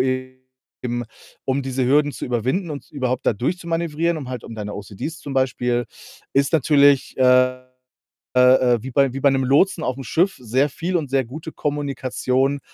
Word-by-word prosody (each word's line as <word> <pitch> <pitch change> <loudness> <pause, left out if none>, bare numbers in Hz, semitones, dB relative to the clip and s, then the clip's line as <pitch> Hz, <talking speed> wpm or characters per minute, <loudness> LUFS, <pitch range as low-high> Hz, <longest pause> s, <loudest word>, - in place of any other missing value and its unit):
eben, 130 -1 -4 0.4
um 135 +1 0
diese 130 -1 -1
Hürden 145 +2 +3
zu - - -6
überwinden 130 - -1
und 145 -2 -7
überhaupt 130 -3 -2
da - - +5
durchzumanövrieren, 170 - -1
um 135 -4 -7
halt 125 -3 -6
um 115 - -8
deine 105 -1 -5
OCDs 105 - -6
zum 140 - -7
Beispiel 125 -2 0 0.5
ist 140 +3 +2
natürlich, 145 -2 +4
äh, 130 0 +4 0.8
äh, - - +6
äh, 125 -1 +5
wie 130 - -6
bei 135 -1 +3
wie - - -3
bei 140 0 +5
'nem 135 0 +1
Lotsen 160 +6 +3
auf'm 130 +1 -3
Schiff 175 +10 +1
sehr 125 +4 +1
viel 175 +6 -2
und 145 -6 -3
sehr 135 -2 +2
gute 155 +7 -8
Kommunikation, 140 -1 -1
130 Hz, 170 wpm, -21 LUFS, 125-145 Hz, 0.8 s, äh